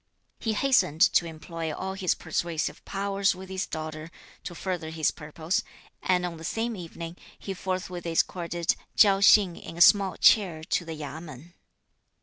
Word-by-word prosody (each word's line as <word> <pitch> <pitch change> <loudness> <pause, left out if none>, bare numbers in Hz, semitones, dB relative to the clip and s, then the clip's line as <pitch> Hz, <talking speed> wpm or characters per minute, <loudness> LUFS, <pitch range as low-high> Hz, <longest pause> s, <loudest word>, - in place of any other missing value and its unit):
He 225 - -1
hastened 215 - +2
to 170 - +3
employ 165 0 -6
all 190 +5 -4
his 190 -2 0
persuasive 165 0 -3
powers 200 -1 0
with 190 +1 -10
his 190 +1 -3
daughter 155 0 -6 0.4
(to 175 - -6
further 180 -3 -4
his 160 -1 0
purpose), 160 +2 -3 0.4
and 180 -1 +1
on 170 -2 -5
the 160 - -11
same 225 +7 -2
evening 170 -1 -8 0.2
he 195 - -5
forthwith 185 -2 -4
escorted 170 0 0 0.2
Chiao 195 -2 +6
Hsing 200 -3 +5
in 165 - -10
a - - -2
small 195 +1 +6
chair 175 -7 +4
to 170 - -1
the 160 -1 -6
Yamên. 155 +1 -9
175 Hz, 155 wpm, -27 LUFS, 160-190 Hz, 0.4 s, Chiao